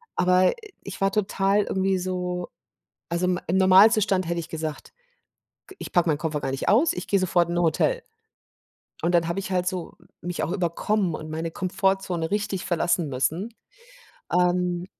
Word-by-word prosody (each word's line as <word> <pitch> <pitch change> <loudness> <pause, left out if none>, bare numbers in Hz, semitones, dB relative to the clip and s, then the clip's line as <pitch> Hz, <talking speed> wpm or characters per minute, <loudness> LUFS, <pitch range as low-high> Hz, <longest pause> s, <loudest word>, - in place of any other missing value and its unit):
Aber 185 0 +3 0.3
ich 195 - -8
war 195 - +2
total 200 0 +1
irgendwie 190 0 0
so 180 -1 -3 0.6
also, 175 +1 0
im 180 0 0
im 185 - +1
Normalzustand 190 -1 +5
hätte 170 0 -1
ich 165 - -8
gesagt: 155 - -6 0.8
„G 385 - -13
ich - - -7
packe 175 -2 +2
meinen 150 - +2
Koffer 155 -3 -2
gar - - -2
nicht 135 - -2
aus, 265 +10 +4
ich 180 - -6
gehe 200 - +2
sofort 175 -2 +1
in 175 - -2
'n - - +2
Hotel.“ 330 - +1 1.0
Und 175 +1 +2
dann 165 -1 +2
habe 170 - -1
ich 195 0 -6
halt 180 -1 0
so 180 -2 -4 0.3
mich 175 0 -3
auch - - -2
überkommen 185 0 0
und 155 0 -8
meine 160 +1 -3
Komfortzone 185 -2 -1
richtig 200 -3 -2
verlassen 175 -1 0
müssen, 165 - -2 0.8
ähm 180 0 +1
180 Hz, 170 wpm, -25 LUFS, 170-195 Hz, 1.0 s, Normalzustand